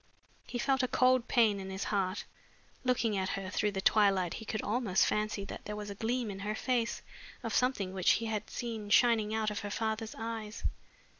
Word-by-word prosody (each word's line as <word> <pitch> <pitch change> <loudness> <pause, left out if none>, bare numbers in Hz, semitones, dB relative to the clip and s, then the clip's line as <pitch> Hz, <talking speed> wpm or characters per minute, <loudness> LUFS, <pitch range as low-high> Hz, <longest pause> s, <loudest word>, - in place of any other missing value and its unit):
He 245 - -4
felt 265 +2 +2
a 255 - +1
cold 255 -1 +3
pain 220 -4 +3
in 190 0 -6
his 190 +1 -3
heart. 195 -1 -1 0.6
Looking 240 -4 +1
at 190 -1 0
her 195 -1 -3
through 210 0 0
the 190 - -2
twilight 195 -4 +3
he 220 - -7
could 215 0 -3
almost 215 -4 +2
fancy 210 -1 -1
that - - -8
there 210 - -4
was 210 -1 -5
a - - -4
gleam 225 +2 -1
in 195 - -7
her 210 +2 -2
face 240 -1 -1 0.4
of - - -3
something 230 -7 +1
which 185 -2 +4
he 230 - -1
had 215 -2 -3
seen 225 -4 -4
shining 220 -1 +4
out 215 -1 0
of 210 - -3
her 205 - -5
father's 220 +1 -2
eyes. 225 -1 -5
215 Hz, 205 wpm, -32 LUFS, 200-230 Hz, 0.6 s, which